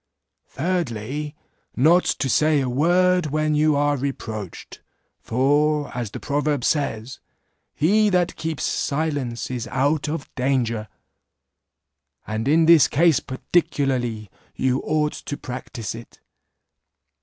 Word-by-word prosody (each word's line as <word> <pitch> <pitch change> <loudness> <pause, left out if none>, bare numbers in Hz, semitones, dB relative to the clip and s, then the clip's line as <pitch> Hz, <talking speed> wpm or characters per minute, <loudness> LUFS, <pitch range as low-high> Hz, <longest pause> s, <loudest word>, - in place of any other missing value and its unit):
"Thirdly, 150 - -3 0.4
Not 165 +8 +4
to 135 - -1
say 150 +3 +3
a 135 - -1
word 175 +6 +2
when 155 +1 0
you 150 0 +3
are 145 0 +2
reproached; 110 -8 -6 0.4
for, 145 +4 +1
as 120 -3 -3
the - - -7
proverb 145 -2 -1
says, 130 -5 -1 0.6
'He 210 +7 +3
that 180 -2 +1
keeps 160 -2 -4
silence 140 -6 -2
is 120 -3 -4
out 145 +4 0
of 150 -3 -5
danger.' 125 -4 -1 1.4
And 110 +3 -3
in 160 +3 +4
this 165 -2 +7
case 165 0 +3
particularly 130 - -1 0.2
you 130 0 0
ought 150 0 0
to 145 - -6
practice 125 -3 -6
it. 115 +1 -12
145 Hz, 115 wpm, -22 LUFS, 125-155 Hz, 1.4 s, this